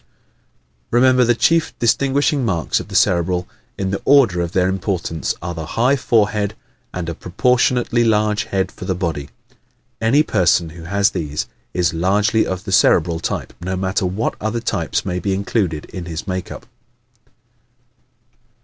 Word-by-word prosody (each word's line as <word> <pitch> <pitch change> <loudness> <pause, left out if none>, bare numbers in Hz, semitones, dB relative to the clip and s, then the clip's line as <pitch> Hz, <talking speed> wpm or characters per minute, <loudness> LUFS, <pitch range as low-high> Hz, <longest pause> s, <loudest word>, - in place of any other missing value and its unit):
_Remember, 125 +1 +4
the 120 - +3
chief 165 +6 +2
distinguishing 140 +3 +1
marks 90 -8 0
of - - -8
the - - -8
Cerebral, 90 0 +2 0.3
in 95 -1 -2
the 100 - -3
order 125 -11 +4
of 85 -1 -3
their 90 0 +2
importance, 95 -3 -2
are 85 0 -3
the 80 -1 -6
HIGH 130 +4 +3
FOREHEAD 105 -4 +1 0.4
and 90 -2 -5
a 85 - -3
PROPORTIONATELY 120 +6 +1
LARGE 105 -1 +1
HEAD 95 -1 -1
FOR - - -9
THE 95 - -1
BODY. 80 -6 -3 0.7
Any 130 +7 +4
person 85 - +2
who 80 +1 -11
has 100 +4 +2
these 75 -5 -3 0.3
is 85 -2 +1
largely 100 +6 +2
of 95 0 -4
the 95 - -6
Cerebral 85 -3 +3
type - - -4
no 95 +2 -3
matter 95 +1 -1
what 95 +6 -2
other 110 +2 -1
types 105 -1 -2
may 90 -1 -2
be 95 +2 -1
included 95 -5 -1
in 90 -2 -8
his 85 -1 -5
makeup. 95 -1 -5
95 Hz, 155 wpm, -19 LUFS, 90-115 Hz, 0.7 s, Remember